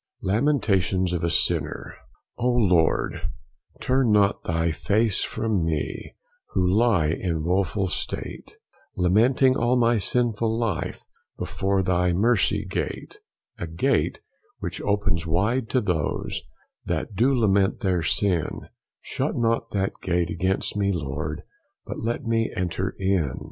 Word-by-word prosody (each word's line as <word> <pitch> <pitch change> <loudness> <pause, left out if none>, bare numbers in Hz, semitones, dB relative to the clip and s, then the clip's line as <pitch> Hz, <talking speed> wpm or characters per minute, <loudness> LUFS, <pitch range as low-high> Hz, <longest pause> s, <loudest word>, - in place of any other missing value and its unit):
THE - - -3
LAMENTATIONS 100 -7 +1
OF 85 - -2
A 85 - +1
SINNER. - - 0 0.5
O 125 - +2
Lord, 95 -10 +2 0.6
turn 130 -3 +2
not 105 -1 +3
thy 80 0 0
face 100 +7 +1
from 110 -6 -1
me, 75 -4 -3 0.4
Who 90 -1 +2
lie 100 -5 +3
in 80 -1 -2
woeful 95 +3 0
state, - - -3 0.4
Lamenting 120 +9 +4
all 120 0 +2
my 120 -1 +3
sinful 115 0 +1
life 110 -9 -2 0.3
Before 95 0 -1
thy 90 -1 +1
mercy 105 -1 +2
gate; - - -4 0.4
A 85 - -4
gate 80 +1 0 0.4
which - - -4
opens 100 -5 0
wide 110 +9 0
to 130 - +2
those 90 -8 -2 0.4
That - - -3
do 125 +8 +3
lament 100 -4 +2
their 95 -5 +1
sin: 85 +1 0 0.3
Shut - - -2
not 115 0 0
that 95 -1 -2
gate 85 -2 0
against 95 +5 0
me, 100 -1 +1
Lord, 75 -2 -4 0.4
But - - -6
let 120 +4 -2
me 115 0 +1
enter 90 +1 -2
in. 95 -8 0
95 Hz, 130 wpm, -24 LUFS, 85-115 Hz, 0.6 s, Lamenting